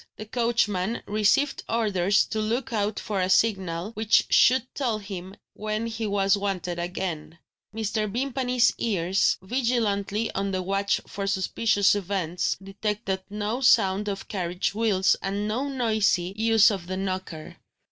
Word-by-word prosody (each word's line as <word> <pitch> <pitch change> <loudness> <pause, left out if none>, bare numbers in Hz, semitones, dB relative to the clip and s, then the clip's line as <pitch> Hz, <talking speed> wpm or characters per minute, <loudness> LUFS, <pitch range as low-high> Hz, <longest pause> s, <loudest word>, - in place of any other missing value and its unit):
The 215 - -7
coachman 225 -3 0
received 215 +7 +1
orders 200 -4 +2
to 220 - -3
look 235 +4 -2
out 210 -1 -1
for 200 -3 -2
a 185 - 0
signal, 190 -3 +1
which 220 -1 +2
should 255 0 +5
tell 245 -6 -1
him 195 -2 -8 0.2
when 215 +1 -3
he 225 -1 -3
was 200 -1 +2
wanted 185 -3 -3
again. 170 -2 -4 0.3
Mr. 215 -1 -2
Vimpany's 250 0 +1
ears, 190 -4 +1
vigilantly 225 -2 0
on 195 +1 -2
the 185 -1 -2
watch 195 +1 0
for 200 0 -5
suspicious 200 +1 +2
events, 185 -4 -1
detected 195 0 -3
no 210 +4 -3
sound 210 -4 +3
of 195 0 -5
carriage 180 -2 -2
wheels 205 -3 +2
and 200 +2 -2
no 245 +6 -1
noisy 215 -8 +1
use 225 0 +5
of 185 -4 -5
the 185 +1 -3
knocker. 185 -4 -5
205 Hz, 140 wpm, -25 LUFS, 190-225 Hz, 0.3 s, should